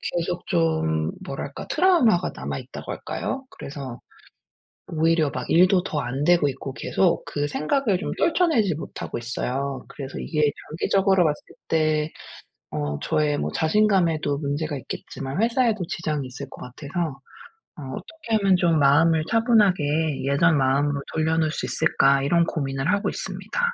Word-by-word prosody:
계속 175 +1 -2
좀 80 -1 +1
뭐랄까 140 0 -6
트라우마가 315 - +3
남아 - - -4
있다고 - - -8
할까요? 270 0 -4
그래서 135 -4 -8 0.9
오히려 160 -1 +2
막 125 -1 -5
일도 180 +1 +5
더 150 -5 -2
안 130 +2 -2
되고 170 -3 +4
있고 135 0 -5
계속 180 +4 +1
그 145 0 -2
생각을 200 - 0
좀 - - -4
떨쳐내지 315 - +2
못하고 160 - -6
있어요. 130 +3 -3
그래서 135 -1 -7
이게 150 -2 +1 0.2
장기적으로 190 +3 +2
봤을 150 -2 0 0.3
때 155 -1 +1 0.6
어 75 -1 -3
저의 150 -1 +1
뭐 - - -2
자신감에도 165 -5 +2
문제가 145 +1 -2
있겠지만 135 +4 -5
회사에도 230 -3 +2
지장이 150 -5 -3
있을 135 +2 -7
것 - - -12
같아서 155 +6 -4 0.7
어 150 - -9
'어떻게 280 -9 -3
하면 195 -2 +3
좀 170 -3 +2
마음을 155 +3 +4
차분하게 185 - +2
예전 150 +3 +3
마음으로 140 +2 +1
돌려 160 0 +1
놓을 160 -1 +2
수 - - -3
있을까?' 140 -3 +3
이런 170 +5 +3
고민을 135 -3 -1
하고 205 0 +1
있습니다. - - -4
155 Hz, 335 characters per minute, -24 LUFS, 140-180 Hz, 0.9 s, 일도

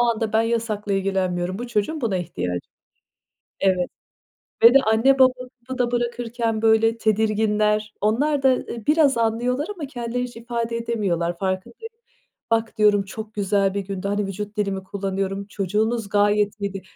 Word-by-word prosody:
anda 230 -2 +1
ben 220 +1 +4
yasakla 225 -3 -1
ilgilenmiyorum. 190 -1 -1
Bu 245 - -4
çocuğun 240 +7 -1
buna 220 -7 0
ihtiyacı 155 - -3
var. 90 - -2 1.0
Evet 185 -2 +2 0.8
ve 235 +3 +9
de - - +9
anne 265 +5 +4
baba 260 -1 +7 0.3
kapıda 255 -2 -1
bırakırken, 235 -2 -1
böyle, 225 +1 +3
tedirginler. 215 0 +1
Onlar 270 +8 +1
da, 265 - +6
eee, 235 -3 -6
biraz 295 -4 +4
anlıyorlar 240 +5 0
ama 305 -5 -5
kendileri 245 -1 -4
hiç 240 -2 -9
ifade 235 0 -3
edemiyorlar, 190 -8 -1
farkındayı 195 - -4 0.6
"Bak," 225 0 0
diyorum, 210 -1 +4
"çok 215 +2 -8
güzel 195 -1 +1
bir 200 - -1
gündü." 195 0 -4
Hani, 205 0 0
vücut 205 +2 -6
dilimi 195 -2 -1
kullanıyorum, 195 0 -3
"Çocuğunuz 210 +3 -1
gayet 205 +1 +2
iyiydi." 195 -1 -3
215 Hz, 150 wpm, -23 LUFS, 200-235 Hz, 1.0 s, ve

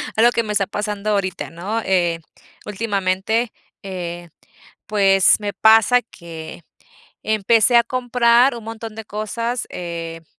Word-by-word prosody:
algo 235 +2 +5
que 230 - 0
me 215 - -5
está 200 -2 +1
pasando 210 0 -3
ahorita, 190 -3 -2
¿no? 195 +7 -4
Eh, 175 -4 +1 0.5
últimamente, 205 +2 -1 0.3
eh, 175 -3 -6 0.6
pues, 195 -2 +4
me 205 -1 -4
pasa 225 +3 +5
que 165 -6 -11 0.6
empecé 220 +2 +3
a 235 - +7
comprar 245 0 +3
un 230 - -9
montón 225 -1 -7
de 220 - -8
cosa, 215 +3 -3 0.2
em, 165 -2 -6
210 Hz, 125 wpm, -20 LUFS, 185-230 Hz, 0.6 s, a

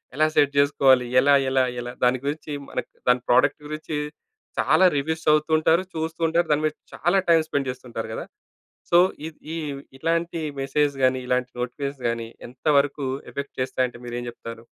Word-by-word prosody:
ఎలా 155 +2 +3
సెట్ 145 -1 +4
చేసుకోవాలి? 135 -3 +4
ఎలా? 140 +2 +5 0.2
ఎలా? 130 0 +3 0.2
ఎలా? 120 0 -6
దాని 125 +1 +4
గురించి 150 +1 -3 0.2
మనకి - - -4 0.2
దాని 125 0 +4
ప్రోడక్ట్ 135 +4 +4
గురించి 155 0 -4 0.6
చాలా 185 - +4
రివ్యూస్ 160 +3 -2
చదువుతూంటారు 155 +3 +3
చూస్తూతుంటారు 160 +1 0
దాని 150 +1 +2
మీద 155 - 0 0.2
చాలా 175 +6 +2
టైమ్ 165 -1 +5
స్పెండ్ 135 -2 -1
జేస్తుంటరు 120 -3 -7
గదా! - - -5 0.7
సో 175 - +6 0.3
ఇద్ 160 - -14 0.2
ఈ - - -3 0.4
ఇట్లాంటి 165 +3 -1 0.2
మెసేజ్ 140 +1 +1
గాని 130 0 +3
ఇలాంటి 125 0 0
నోటిఫికేషన్స్ 140 +2 -4
గాని 115 -1 -3 0.2
ఎంత 125 +4 -17
వరకు 140 0 0 0.3
ఎఫెక్ట్ 140 0 -6
చేస్తాయి 130 0 0
అంటే 120 - -13
మీరేం 120 0 -4
చెప్తారు? 115 -1 -9
140 Hz, 160 wpm, -24 LUFS, 125-155 Hz, 0.7 s, సో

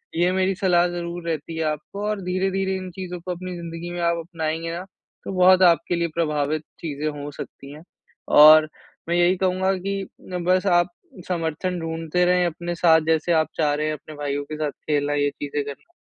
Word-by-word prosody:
ये 175 +2 +2
मेरी 190 0 +1
सलाह 180 -2 +3
ज़रूर 175 0 -5
रहती 160 +1 -4
है 160 - 0
आपको 155 +7 -4
और 210 -2 -2
धीरे-धीरे 190 +1 -1
इन 185 -1 -5
चीज़ों 180 -1 -6
को 180 +2 -6
अपनी 180 0 -5
ज़िंदगी 170 0 -6
में 175 - -4
आप 170 0 +2
अपनाएँगे 165 -1 -3
ना, 180 - -5 0.4
तो - - -4
बहुत 185 0 +6
आपके 170 0 +4
लिए 170 0 0
प्रभावित 150 -2 0 0.2
चीज़ें 150 -2 -4
हो 145 - -5
सकती 140 0 -9
हैं। 155 +2 -12 0.6
और 155 +1 +9 0.4
मैं 170 - +2
यही 175 +1 +4
कहूँगा 190 +1 +1
कि 195 +1 -3 0.4
बस 185 +1 +3
आप 175 +1 0 0.4
समर्थन 175 +1 -2
ढूँढ़ते 165 +2 -1
रहें 180 0 +3
अपने 175 +1 -3
साथ, 165 -1 +5
जैसे 160 +2 +2
आप 160 -1 +3
चाह 150 -2 +2
रहे 150 +1 -1
हैं 155 - -1
अपने 155 +1 -10
भाइयों 145 -1 -3
के 155 - -6
साथ 150 -2 -1
खेलना, 145 -1 -1
ये 145 0 +2
चीज़ें 145 0 -4
करना। 145 - -10
170 Hz, 195 wpm, -23 LUFS, 155-180 Hz, 0.6 s, और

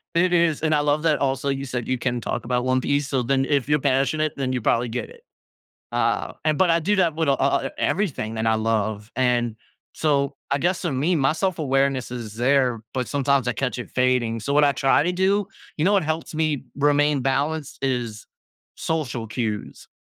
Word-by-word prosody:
it 175 +2 +3
is 170 -3 +2
and 155 -1 +2
I 145 - +3
love 145 +1 +1
that 155 -2 +2
also 135 0 0
you 135 0 -1
said 125 -3 -4
you 130 -1 -1
can 120 -1 -1
talk - - -3
about 125 +1 0
One 130 0 +2
Piece, 140 +1 0
so 130 -2 0
then, 135 +2 +1
if 140 -1 0
you're 150 - +3
passionate, 140 +3 +1
then 130 -2 -2
you 125 - -1
probably 120 +2 +1
get 115 - -4
it. 480 -1 -16 0.7
Uh, - - 0
and 155 -1 +1
but 185 -2 +4
I 165 - +4
do 205 +6 +1
that 175 -4 +2
wit 160 -2 0
a - - +5
a - - +3
all 135 0 +1
e - - -4
everything 145 - -1
that 110 0 -2
I 110 - +3
love, 110 -1 -1
and 120 -3 +1 0.4
so, 140 -2 0
I 140 - +2
guess 175 +5 0
so 170 -5 -2
me, 150 +8 +1
my 135 0 +2
self-awareness 140 -8 0
is 115 -4 -6
there, 125 -1 +2
but 130 -2 -2
sometimes 140 -2 +1
I 125 - 0
catch 125 0 -2
it 120 - -7
fading, 125 -3 +1
so 140 +6 -3
what 150 +1 +5
I 140 - +4
try 135 +2 +3
to 180 +3 0
do 195 +2 +1 0.3
you 155 - 0
know 200 - +4
what 195 -6 +3
helps 160 +1 -3
me 155 -3 0
remain 145 0 +3
balanced 140 +3 -1
is 120 -5 -2 0.5
social 135 -8 -2
cues, 110 -2 -4
135 Hz, 215 wpm, -23 LUFS, 125-155 Hz, 0.7 s, a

